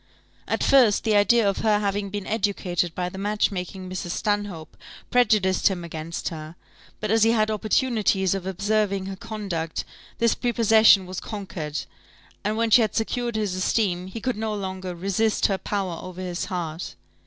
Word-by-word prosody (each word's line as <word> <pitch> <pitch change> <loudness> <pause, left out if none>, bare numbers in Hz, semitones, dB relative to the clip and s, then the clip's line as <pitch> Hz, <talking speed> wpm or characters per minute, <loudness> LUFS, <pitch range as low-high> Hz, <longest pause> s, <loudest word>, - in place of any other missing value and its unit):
At - - -1
first, 250 -7 +5
the 220 -2 +2
idea 210 +2 +4
of 195 - +1
her 215 -2 +3
having 200 -1 -1
been 205 0 -5
educated 190 -5 -1
by 180 -1 -1
the 190 +2 -7
match 210 +1 +1
making 185 0 -5
Mrs. 185 -1 -5
Stanhope 205 -5 -2 0.4
prejudiced 215 -6 +3
him 185 -3 -1
against 165 0 -5
her; 155 0 -8 0.4
but 215 -1 -2
as 225 0 +3
he 225 +1 +5
had 215 -1 +2
opportunities 215 -3 +1
of 190 -1 -4
observing 200 +1 0
her 195 0 -5
conduct, 185 -6 -4 0.3
this 230 0 +3
prepossession 225 -5 +5
was 185 0 -5
conquered, 180 -8 -5 0.6
and 210 +2 -1
when 230 0 +1
she 240 - +8
had 215 -2 0
secured 235 +1 -1
his 210 -4 -1
esteem, 185 -1 0
he 210 +5 -6
could 250 0 -2
no 220 -1 -2
longer 190 -2 -5
resist 200 +5 +1
her 195 -2 +1
power 190 -5 -3
over 185 0 -8
his 180 -1 -3
heart. 170 -3 -4
200 Hz, 170 wpm, -24 LUFS, 185-215 Hz, 0.6 s, she